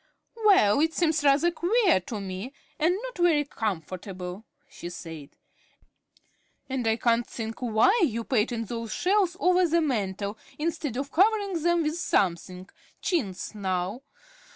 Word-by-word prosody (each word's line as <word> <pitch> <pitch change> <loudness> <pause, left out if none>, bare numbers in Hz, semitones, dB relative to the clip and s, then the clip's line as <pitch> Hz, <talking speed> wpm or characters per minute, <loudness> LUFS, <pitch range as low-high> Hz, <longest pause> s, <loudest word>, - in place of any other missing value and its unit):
"Well, 280 - +5
it 320 +2 +1
seems 320 -3 +1
rather 290 +5 +4
queer 360 - +3
to 220 - -4
me 195 +6 -6 0.3
and 335 +3 +3
not - - -7
very 325 -4 +3
comfortable," 185 - -5 0.2
she 175 - -8
said. 165 -4 -9 1.4
"And 260 -3 -2
I 220 - +3
can't 235 0 +1
think 225 0 -6
why 245 - +3
you 230 -7 0
painted 230 -1 0
those 230 -1 -5
shelves 370 -2 +1
over 365 -1 +4
the 335 +1 +2
mantel 205 - -2 0.2
instead 305 -5 -2
of 280 +1 -4
covering 400 -2 +2
them 345 0 +2
with 310 +2 -1
something, 185 - 0 0.3
chintz, 205 - -2
now. 190 +2 -2
245 Hz, 135 wpm, -27 LUFS, 200-335 Hz, 1.4 s, Well